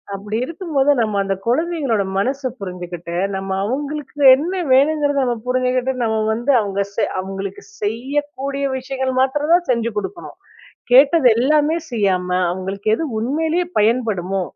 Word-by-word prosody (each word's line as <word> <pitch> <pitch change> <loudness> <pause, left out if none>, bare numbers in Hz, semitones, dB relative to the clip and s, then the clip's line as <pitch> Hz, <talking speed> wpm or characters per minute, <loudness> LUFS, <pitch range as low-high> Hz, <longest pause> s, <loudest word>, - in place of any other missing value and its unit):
அப்படி 210 +2 -4
இருக்கும்போது 305 -4 0
நம்ம 215 -3 0
அந்த 195 0 -1
கொழந்தைகளோட 275 - 0
மனசை 265 +5 -1
புரிஞ்சுகிட்டு, 175 -2 -6 0.2
நம்ம 190 0 -4
அவங்களுக்கு 290 +3 -4 0.2
என்ன 340 +6 -3 0.2
வேணுங்கிறத 285 +1 +3
நம்ம 240 -1 0
புரிஞ்சுகிட்டு 255 +1 0
நம்ம 220 -1 0 0.2
வந்து 240 +5 0
அவங்க 200 -1 -2
செ - - 0 0.2
அவங்களுக்கு 195 0 -6 0.2
செய்யக்கூடிய 280 - -2
விஷயங்கள் 260 0 -3
மாத்திரம் 295 +5 +1
தான் 350 0 +3
செஞ்சு 235 -1 0
குடுக்கணும். 340 - -6 0.6
கேட்டது 275 +1 +6
எல்லாமே 300 +5 +2
செய்யாம, 190 -5 0 0.2
அவங்களுக்கு 190 +3 -4
எது 325 - -2 0.2
உண்மையிலே 320 +8 0 0.2
பயன்படுமோ, 210 -5 0
255 Hz, 130 wpm, -19 LUFS, 200-290 Hz, 0.6 s, கேட்டது